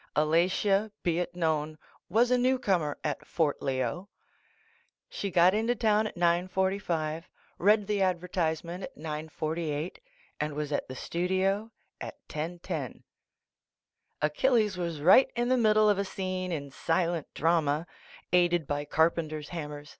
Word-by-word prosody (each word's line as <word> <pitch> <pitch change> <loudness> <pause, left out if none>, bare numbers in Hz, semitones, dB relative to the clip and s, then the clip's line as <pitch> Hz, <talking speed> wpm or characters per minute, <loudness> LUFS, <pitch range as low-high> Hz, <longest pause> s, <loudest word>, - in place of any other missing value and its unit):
Alatia. 185 +7 +2
be 170 -1 +1
it 175 0 -3
known, 155 -2 -1 0.3
was 235 +6 +3
a 250 - +5
newcomer 200 - +1
at 150 -2 -2
Fort 155 -4 0
Leo. 130 +8 -2 1.0
She 200 - -4
got 180 +1 +5
into 225 +3 +1
town 215 -1 +2
at 210 - -10
9 175 +1 +2
:45, 175 -4 -1 0.3
read 210 +2 +4
the 205 -1 0
ad 185 -2 +2
vertisement 170 0 -2
at - - -8
9 155 0 -5
:48, 155 +1 -3 0.4
and 150 -1 -2
was 150 0 -3
at 145 - -1
the 130 - -7
studio 190 - 0 0.3
at - - -6
10:10. 165 +3 -5 1.2
Achilles 210 - +2
was 170 -4 -3
right 185 - +7
in 240 +1 0
the 255 - +4
middle 215 -3 +4
of 205 -2 +3
a - - +1
scene 185 -1 -3
in 140 -4 -4
silent 165 +2 -1
drama, 160 -1 +1 0.5
aided 175 -2 +3
by 145 +1 -2
carpenters' 155 -1 0
hammers 150 -3 -6
175 Hz, 140 wpm, -29 LUFS, 155-195 Hz, 1.2 s, right